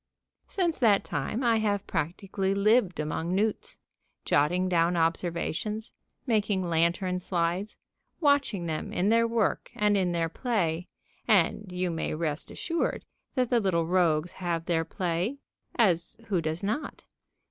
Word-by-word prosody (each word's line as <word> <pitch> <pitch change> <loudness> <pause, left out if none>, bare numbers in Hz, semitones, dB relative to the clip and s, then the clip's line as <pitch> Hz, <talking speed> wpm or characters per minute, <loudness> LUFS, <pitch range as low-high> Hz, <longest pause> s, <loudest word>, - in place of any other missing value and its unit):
Since 350 -5 -1
that 215 -6 +4
time 210 - -3
I 230 -2 +4
have 205 -2 0
practically 190 +4 -2
lived 200 -3 +3
among 160 +3 -2
newts, 210 +2 -1 0.5
jotting 175 +6 +2
down 175 -1 +2
observations, 170 +6 -1 0.3
making 210 -5 +1
lantern 175 +2 +1
slides, 180 +3 -1 0.4
watching 285 - +2
them 160 -2 -3
in 190 +3 +1
their 230 +1 +4
work 230 -3 0
and 210 0 +2
in 185 -3 +1
their 170 -1 0
play 175 -5 -1 0.4
(and 200 -1 +2
you 180 0 -1
may 160 -1 -2
rest 155 -2 -3
assured 335 -1 -2 0.3
that 255 -2 +1
the 240 - +4
little 180 -6 +1
rogues 170 -2 +2
have 170 -3 -3
their 165 -2 +1
play 180 - -2 0.4
as 180 -8 +2
who 185 -5 +1
does 160 +3 -2
not?) 220 +10 -3
185 Hz, 135 wpm, -28 LUFS, 170-215 Hz, 0.5 s, that